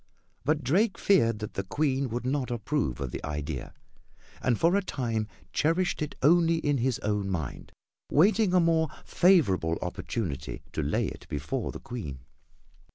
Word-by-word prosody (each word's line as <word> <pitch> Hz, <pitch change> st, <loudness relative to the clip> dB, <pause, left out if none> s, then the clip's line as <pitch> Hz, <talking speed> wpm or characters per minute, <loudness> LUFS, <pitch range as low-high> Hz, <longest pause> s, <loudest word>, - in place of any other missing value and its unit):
But 155 Hz, +1 st, +1 dB
Drake 195 Hz, -, +2 dB
feared 115 Hz, -, +3 dB
that 105 Hz, 0 st, -6 dB
the -, -, -1 dB
Queen 135 Hz, +4 st, 0 dB
would 120 Hz, +2 st, -3 dB
not 130 Hz, 0 st, 0 dB
approve 120 Hz, -, -1 dB
of 70 Hz, -3 st, -3 dB
the -, -, -6 dB
idea, 75 Hz, -2 st, -4 dB, 0.7 s
and 120 Hz, -3 st, +1 dB
for 170 Hz, +3 st, +4 dB
a 200 Hz, -, +3 dB
time 115 Hz, -, -2 dB, 0.3 s
cherished 165 Hz, +4 st, +1 dB
it 150 Hz, -, -3 dB
only 165 Hz, +2 st, +5 dB
in 145 Hz, -4 st, 0 dB
his 125 Hz, 0 st, +1 dB
own 105 Hz, -1 st, 0 dB
mind, 80 Hz, -8 st, -4 dB, 0.4 s
waiting 195 Hz, +4 st, +4 dB
a -, -, +6 dB
more 165 Hz, -1 st, +3 dB, 0.2 s
favorable 95 Hz, -, +3 dB
opportunity 90 Hz, -, -4 dB
to -, -, -1 dB
lay -, -, 0 dB
it -, -, -7 dB
before -, -, -3 dB
the -, -, -8 dB
Queen. 75 Hz, -, -6 dB
130 Hz, 160 wpm, -28 LUFS, 100-165 Hz, 0.7 s, a